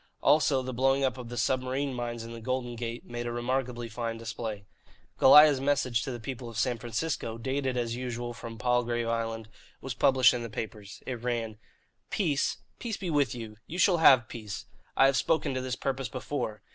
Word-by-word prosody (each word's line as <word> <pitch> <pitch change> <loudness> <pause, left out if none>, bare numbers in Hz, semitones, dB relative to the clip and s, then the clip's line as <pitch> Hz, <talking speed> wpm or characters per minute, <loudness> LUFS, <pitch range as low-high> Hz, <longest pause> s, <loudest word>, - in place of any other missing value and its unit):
Also, 145 -3 +4
the 130 0 -4
blowing 135 +2 +2
up 130 -1 0
of 120 -2 -7
the 120 - -6
submarine 130 +3 0
mines 120 -1 -4
in 115 - -8
the 115 - -8
Golden 125 0 -2
Gate 115 0 -5
made 120 0 -5
a - - -2
remarkably 120 0 -2
fine 115 0 -4
display. 115 -3 -5 0.5
Goliah's 145 0 +8
message 135 -5 +1
to 130 - -4
the 120 - -5
people 120 +1 -6
of 115 - -9
San 120 0 0
Francisco, 120 0 -3
dated 130 +1 -2
as 120 -1 -1
usual 120 -1 -4
from 115 -1 -8
Palgrave 120 -1 +1
Island, 115 -1 -2 0.3
was 135 -1 -5
published 130 +1 +5
in 120 - -2
the 115 - -5
papers. 105 -1 -7
It 125 -3 -4
ran: 115 -3 -2 0.5
"Peace? 155 -9 0 0.2
Peace 225 -3 -3
be 180 -4 -3
with 145 -4 +2
you. 110 -3 -8
You 175 - -6
shall 185 0 +4
have 130 -8 +6
peace. 105 -5 -7 0.3
I 135 - +7
have 135 -2 +4
spoken 160 -2 +1
to 130 - -2
this 130 -1 -2
purpose 135 -2 -2
before. 120 -4 -4
120 Hz, 195 wpm, -29 LUFS, 115-135 Hz, 0.5 s, Goliah's